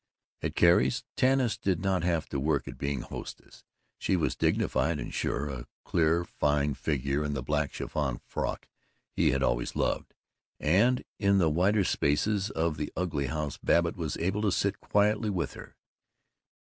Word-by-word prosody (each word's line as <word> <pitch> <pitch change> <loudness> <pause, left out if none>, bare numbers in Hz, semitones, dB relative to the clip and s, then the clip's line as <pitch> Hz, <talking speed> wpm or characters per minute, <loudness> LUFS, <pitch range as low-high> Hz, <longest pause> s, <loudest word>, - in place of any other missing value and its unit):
At - - -3
Carrie's, 85 -7 +4
Tanis 130 -4 +2
did 95 -5 0
not 95 -2 +1
have 85 -4 0
to 70 - -2
work 70 0 0
at - - -8
being 70 -2 -2
hostess. - - -9 0.4
She - - +1
was 85 - 0
dignified 75 +5 +1
and - - -6
sure, 70 - -1
a 65 -4 -6 0.2
clear 85 +1 +2
fine 75 -2 +1
figure 70 0 -1
in 75 -1 -2
the 70 -3 -3
black 75 +1 0
chiffon 70 -5 -2
frock - - -3 0.4
he - - +2
had 65 0 +1
always - - 0
loved; - - -1 0.4
and 105 +11 +3 0.2
in 100 -1 +3
the 85 -5 +3
wider 95 +6 +3
spaces 100 +7 +1
of 80 -3 -1
that - - -3
ugly 80 -7 -1
house 75 0 -3
Babbitt 85 0 +2
was 80 -3 -3
able 95 +5 -1
to 105 -2 +2
sit 100 +2 0
quietly 105 +1 +2
with 90 -4 -2
her. - - -11
80 Hz, 165 wpm, -29 LUFS, 70-95 Hz, 0.4 s, Carrie's